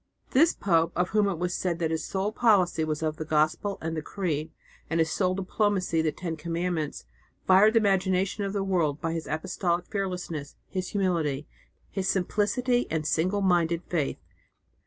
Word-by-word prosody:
"This 320 +6 +4
pope, 165 -3 +2
of 180 +1 +1
whom 210 0 +3
it 195 -4 -1
was 175 +1 -1
said 175 -2 -1
that 165 -2 -1
his 160 0 -1
sole 195 +2 -2
policy 200 -8 +3
was 155 -1 -2
the 155 -1 +1
Gospel 155 +6 +1
and 160 0 -3
the 155 - -2
Creed, 160 -3 -3 0.4
and 165 +1 0
his 160 -1 +2
sole 185 -2 +1
diplomacy 190 -3 0
the 160 -1 +1
Ten 170 -1 -5
Commandments, 165 - -3 0.4
fired 205 +4 +6
the 225 - +6
imagination 190 0 +1
of 195 - -2
the 200 -1 -1
world 165 -7 0
by 165 +2 -2
his 165 -1 -4
apostolic 175 +2 -1
fearlessness, 180 -7 -4
his 185 -1 -3
humility, 165 -8 0 0.5
his 195 -1 -2
simplicity 240 +7 +1
and 155 -1 -1
single 185 +6 +1
minded 170 -2 +2
faith." 155 -6 -1
180 Hz, 170 wpm, -27 LUFS, 160-195 Hz, 0.5 s, fired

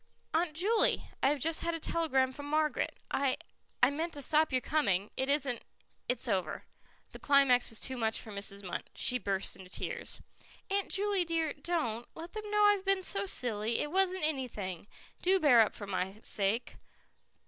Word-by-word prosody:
"Aunt 320 -1 +1
Juley, 420 +7 +3
I - - +4
have 295 - +1
just 320 +4 0
had 335 0 -1
a - - -5
telegram 270 -6 +1
from 285 +2 -7
Margaret; 305 0 0 0.2
I 275 -2 +1 0.5
I - - +7
meant 325 +4 -3
to 285 - -3
stop 310 +2 +3
your 255 - +2
coming. 210 -9 0
It 265 +1 -1
isn't 275 -4 0 0.5
it's 250 +1 0
over." 185 -7 -1 0.5
The - - -10
climax 275 -3 +4
was 225 - -4
too 260 -1 -3
much 220 -2 0
for 220 - -9
Mrs. 200 0 -3
Munt. 180 - -4
She 250 -1 +3
burst 195 -3 0
into 185 -2 -13
tears. - - -5 0.5
"Aunt 400 0 +1
Juley 400 -1 +1
dear, 330 -2 -1
don't. 285 - -27
Don't 240 -10 -1
let 330 +2 -8
them 430 -1 -6
know 420 0 +3
I've 410 -2 +4
been 390 -1 +1
so 395 +1 +2
silly. 230 - +2
It 295 - -2
wasn't 375 -1 +1
anything. 220 - -3 0.3
Do 380 +1 +3
bear 255 -8 +6
up 215 - +1
for 205 - -6
my 190 +1 -3
sake." 205 +4 -1
280 Hz, 185 wpm, -32 LUFS, 225-335 Hz, 0.5 s, I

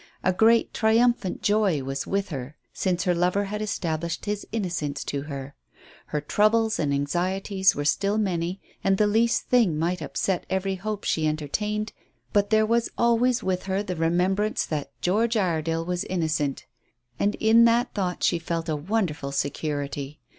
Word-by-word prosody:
A 185 - +2
great 225 +4 +4
triumphant 225 -3 +2
joy 205 -9 +2
was 135 +1 -4
with 200 0 -1
her 140 -1 -6 0.2
since 180 -3 0
her 180 - +2
lover 180 +3 +1
had 210 +2 -4
established 170 -5 -2
his 205 0 -3
innocence 170 -9 -2
to 140 - -3
her. 140 -1 -6 0.5
Her 150 - -2
troubles 220 +7 +2
and 145 -3 0
anxieties 185 +7 +1
were 145 - -3
still 200 +7 +1
many, 180 -3 -1 0.2
and 195 0 +3
the 210 - +4
least 225 +3 +2
thing 225 -11 +3
might 170 +2 -1
upset 160 +5 -2
every 190 +1 0
hope 205 +2 -4
she 155 -1 +1
entertained, 210 +8 -2 0.4
but 205 0 +3
there 220 0 +4
was 230 +1 +1
always 235 +1 +2
with 185 -1 -1
her 195 +1 -1
the 185 -3 -4
remembrance 180 +6 +1
that 150 -3 -3
George 225 +5 +2
Iredale 165 -3 0
was 180 0 -2
innocent, 155 -6 -1 0.5
and 205 +1 +1
in 225 +1 +5
that 235 +1 +2
thought 185 -4 -2
she 170 - +3
felt 165 0 -3
a 155 - +1
wonderful 160 -4 -2
security. 145 0 -3
185 Hz, 160 wpm, -25 LUFS, 160-210 Hz, 0.5 s, in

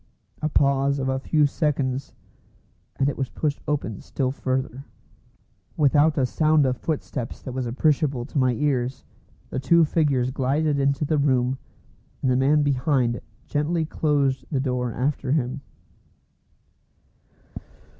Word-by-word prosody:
A 155 - 0
pause 140 -1 +2
of 135 -1 -1
a 130 0 0
few 150 +2 +2
seconds, 140 -3 -1 0.8
and 135 - +1
it 140 - -2
was 135 -2 -1
pushed 150 -2 -2
open 135 -9 -2
still 130 -2 -2
further. 130 0 -3 0.9
Without 150 +1 +4
a 135 - +3
sound 155 +2 +3
of 130 -1 +1
footsteps 140 -6 -4
that 130 - -5
was 130 -1 -3
appreciable 135 0 +1
to 150 - -6
my 130 -1 +3
ears, 130 -1 -1 0.5
the - - -2
two 165 +5 +4
figures 140 -6 +1
glided 140 +3 0
into 140 +2 +1
the 150 0 +1
room, 130 -2 +1 0.6
and 130 - +3
the - - +3
man 145 +3 +3
behind 130 -3 +1 0.2
gently 160 +2 0
closed 140 -4 0
the 140 - +1
door 125 -2 -1
after 135 +2 -1
him. 135 -2 -1
135 Hz, 135 wpm, -24 LUFS, 130-150 Hz, 0.9 s, Without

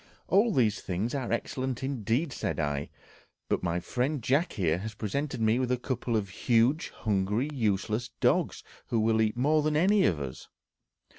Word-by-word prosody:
"All 210 +5 +4
these 115 - +2
things 95 +6 -2
are 135 -4 -2
excellent 130 +2 -2
indeed," 130 +3 -1
said - - -3
I; 75 -1 -1 0.6
"but - - +1
my 85 0 0
friend 130 - -2
Jack 145 +9 +1
here 85 -3 +1
has 110 +2 -6
presented 135 +7 -3
me 110 +2 +3
with 125 -1 0
a 125 - +2
couple 125 -1 -2
of 100 -2 -2
huge, 120 - +2
hungry, 105 +6 -1
useless 110 0 0
dogs, - - +1 0.2
who 115 - 0
will 110 0 +3
eat 110 +1 0
more 150 +5 +3
than 150 0 +1
any 190 +3 +4
of 80 - 0
us." 65 -3 -6
115 Hz, 170 wpm, -29 LUFS, 105-140 Hz, 0.6 s, All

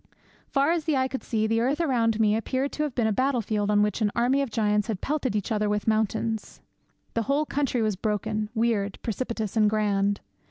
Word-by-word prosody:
Far 280 +3 +2
as 335 -3 0
the 310 -4 +1
eye 260 0 +2
could 265 0 -5
see, 220 -2 -1
the 225 +1 +1
earth 270 +6 +1
around 235 -8 +1
me 215 -1 +4
appeared 260 +5 -1
to - - -4
have 295 -4 -2
been 235 - +1
a 220 - +2
battle 260 +4 +1
field 210 -1 -1
on 210 0 +4
which 210 +2 -1
an 210 - +3
army 250 +4 +2
of 275 - -2
giants 210 -1 +1
had 215 -5 -2
pelted 275 -4 -1
each 205 0 -2
other 210 -1 +1
with 210 0 -1
mountains. 220 0 -1 0.5
The 230 - 0
whole 290 +2 +2
country 275 -5 0
was 215 -2 0
broken, 210 +1 -2
weird, 220 -3 0
precipitous, 225 -2 -3
and 215 -2 +4
grand. 205 -1 +1
225 Hz, 215 wpm, -26 LUFS, 210-260 Hz, 0.5 s, me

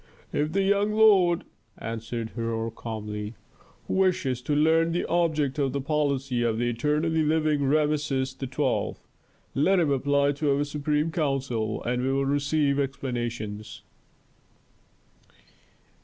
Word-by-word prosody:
"If 150 +2 0
the 195 0 +2
young 200 +2 +2
lord," 195 -6 +5 0.3
answered 115 0 -5
Herhor 115 -1 -3
calmly, 105 -1 -6 0.5
"wishes 175 -10 +1
to 145 +3 -1
learn 165 +2 +3
the 175 - 0
object 155 -5 0
of 135 -2 0
the 140 - -1
policy 140 -3 0
of 115 -2 +1
the 120 +1 0
eternally 150 +6 +1
living 155 -2 +1
Rameses 145 -2 +1
XII., 130 -1 -1 0.6
let 180 +7 +3
him 160 -4 +2
apply 140 +1 +2
to 145 -1 0
our 145 - +1
Supreme 150 +2 -1
Council 135 -8 -1
and 125 +1 -1
he 130 - -1
will 135 0 +1
receive 145 0 +1
explanations." 120 -6 -4
140 Hz, 125 wpm, -26 LUFS, 125-155 Hz, 0.6 s, lord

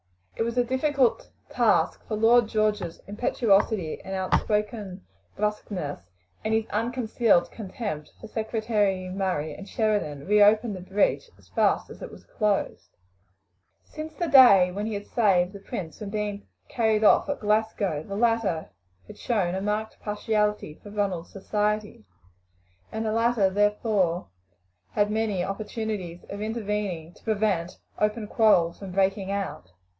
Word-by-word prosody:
It - - 0
was 235 +1 -3
a 245 - +4
difficult 260 +1 +1 0.2
task, - - +2
for 215 - -2
Lord 230 +2 +5
George's 210 -6 -1
impetuosity 205 -4 +1
and 190 0 -5
outspoken 205 0 -1 0.3
brusqueness, 210 - -3 0.4
and 220 0 +1
his 220 0 +1
unconcealed 230 -4 +1
contempt 195 -7 -6
for 220 - -9
Secretary 215 -4 -1
Murray 185 -5 -2
and 200 0 -10
Sheridan, 205 -11 -1
reopened 210 +2 +4
the - - -7
breach 200 - 0
as - - -23
fast - - +1
as - - -12
it - - -6
was - - -14
closed. 210 -2 -2 0.9
Since 310 +1 -8
the 345 - -1
day 200 - +7
when 205 +3 -3
he 220 - -3
had 200 0 -5
saved 190 -5 +2
the 200 - -8
prince 175 -4 -6
from 210 - -6
being 205 -1 -4 0.2
carried 220 -2 +1
off 215 - +5
at 285 - -2
Glasgow 210 -6 0
the 195 +5 -7
latter 225 -7 0 0.3
had - - -13
shown 195 -7 0
a 190 - -2
marked 210 +2 -2
partiality 210 -4 -1
for 205 - -11
Ronald's 200 -5 -2
society, 210 - -2 0.9
and 220 0 -3
the 215 - 0
latter 230 -1 +2
had 190 -1 +3
therefore 205 - +1 0.8
many 210 -3 0
opportunities 200 -3 -4
of 200 +1 -6
intervening 210 -6 -3
to - - -22
prevent 200 -6 0 0.2
open 210 +1 0
quarrels 195 -6 +3
from 195 -2 -7
breaking 195 0 +1
out. 195 - -4
210 Hz, 140 wpm, -26 LUFS, 190-220 Hz, 0.9 s, day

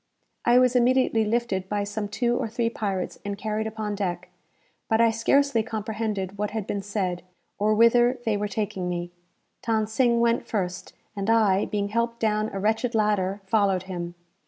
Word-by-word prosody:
I 240 +1 +5
was 250 0 +4
immediately 250 -2 +3
lifted 210 -4 -1
by 205 -1 0
some 205 +1 -3
two 235 +3 0
or - - -1
three 230 +1 -1
pirates 195 -5 -3
and 200 0 -4
carried 215 +2 -2
upon 215 -1 -4
deck; 180 -3 -3 0.6
but 220 - +3
I 230 -1 +5
scarcely 240 +2 +2
comprehended 215 -3 -3
what 210 0 0
had 215 -2 -4
been 200 - -3
said, 195 -3 -2 0.4
or 215 +1 +2
whither 240 +3 +5
they 220 -2 +1
were 205 0 -1
taking 200 -3 -3
me. 175 0 -3 0.6
Than 220 -1 +2
Sing 235 +2 +2
went 235 0 +1
first; 185 -5 -3 0.2
and 200 +1 -2
I, 210 -4 +4
being 200 -1 -2
helped 235 +2 -1
down 215 -1 +1
a 195 - -4
wretched 225 +4 0
ladder, 205 -2 +1
followed 195 -2 +2
him. 175 -2 -6
215 Hz, 175 wpm, -25 LUFS, 200-230 Hz, 0.6 s, I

